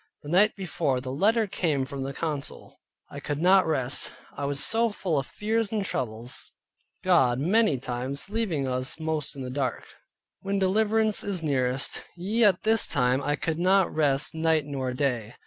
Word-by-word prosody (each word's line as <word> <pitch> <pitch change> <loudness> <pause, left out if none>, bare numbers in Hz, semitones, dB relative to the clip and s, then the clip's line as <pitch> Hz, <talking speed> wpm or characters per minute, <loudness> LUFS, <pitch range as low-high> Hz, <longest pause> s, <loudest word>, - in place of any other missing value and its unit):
The 145 - -8
night 195 +6 +4
before 160 -8 -1
the 130 0 -6
letter 215 - +2
came 155 -8 -1
from 135 +1 -6
the 135 +1 -3
council, 150 -1 -5 0.3
I 140 - -7
could 145 +1 -4
not 185 +2 +5
rest, 135 -4 -1 0.2
I 140 - -3
was 140 0 0
so 230 +1 +3
full 180 -7 -1
of 135 - -5
fears 220 0 -1
and 210 -3 -1
troubles, 120 -6 -4 0.5
God 135 -10 +4
many 190 0 +3
times 130 +2 -3
leaving 195 -10 -1
us 130 +3 -2
most 155 -2 -2
in 135 - -6
the 125 - -5
dark, 135 -1 -2 0.5
when 200 +1 -2
deliverance 215 +2 +2
is 190 -4 -2
nearest. 135 -2 0
Yea, 215 +6 +1
at 190 -3 +3
this 220 0 +3
time 125 +2 +1
I 145 +1 0
could 160 +1 -3
not 190 +1 +3
rest 145 -2 +1
night 160 -2 +1
nor 135 -3 -3
day. 125 -5 -2
155 Hz, 175 wpm, -26 LUFS, 135-195 Hz, 0.5 s, not